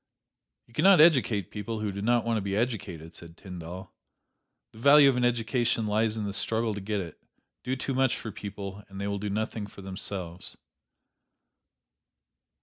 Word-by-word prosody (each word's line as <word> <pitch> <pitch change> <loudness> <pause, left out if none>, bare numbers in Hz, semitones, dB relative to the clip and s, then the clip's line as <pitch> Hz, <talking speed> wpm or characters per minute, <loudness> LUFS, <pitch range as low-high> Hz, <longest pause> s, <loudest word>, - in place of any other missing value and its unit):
"You 115 - -24
can - - 0
not 195 -3 +7
educate 120 - +4
people 110 +1 -4
who 105 -1 -1
do 100 +1 -5
not 120 +2 +2
want 115 -1 +1
to - - -1
be 100 0 -2
educated," 100 -8 -3
said 85 0 -10
Tyndall. 90 0 -8 0.8
The 110 - -14
value 140 +3 +8
of 135 - +4
an 125 - 0
education 120 -1 +1
lies 110 +1 +1
in 110 - -2
the 100 -1 -3
struggle 110 +1 0
to 100 - -5
get 105 +1 -2
it. 85 -4 -9 0.4
Do 130 - -1
too 135 +1 -3
much 130 0 +2
for 110 - -6
people, 100 -1 -7
and 95 0 -9
they 100 - -2
will 100 0 -2
do 105 +1 -3
nothing 110 0 -2
for 100 -1 -12
themselves. 95 -2 -5
105 Hz, 180 wpm, -28 LUFS, 100-115 Hz, 0.8 s, value